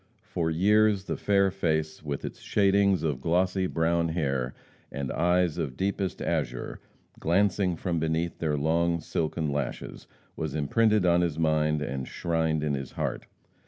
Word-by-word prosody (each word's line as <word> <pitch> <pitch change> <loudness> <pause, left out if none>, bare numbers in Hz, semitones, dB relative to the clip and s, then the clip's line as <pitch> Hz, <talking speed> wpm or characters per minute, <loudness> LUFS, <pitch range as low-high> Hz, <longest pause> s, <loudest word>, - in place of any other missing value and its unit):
For 80 -2 -2
years 105 +4 +3
the - - -3
fair 100 -1 +2
face, 80 -3 -1
with 75 -2 -4
its - - -7
shadings 100 -3 +2
of 75 -5 -1
glossy 90 +3 +1
brown 85 0 +1
hair, 70 -6 -1 0.4
and 70 -2 -4
eyes 90 -1 +1
of 70 -6 -3
deepest 95 -1 -2
azure, 60 +1 -2 0.4
glancing 95 +1 +2
from 85 0 -2
beneath 80 +1 -1
their 75 -2 0
long 85 +3 +1
silken 80 -1 -2
lashes, 70 -3 -4 0.3
was 80 -3 -4
imprinted 105 +7 +2
on 85 0 +4
his 85 -3 -1
mind 75 -1 +1
and 70 -2 -4
shrined 80 -2 -1
in 75 -1 0
his 70 -2 -4
heart. - - -3
80 Hz, 150 wpm, -27 LUFS, 75-90 Hz, 0.4 s, on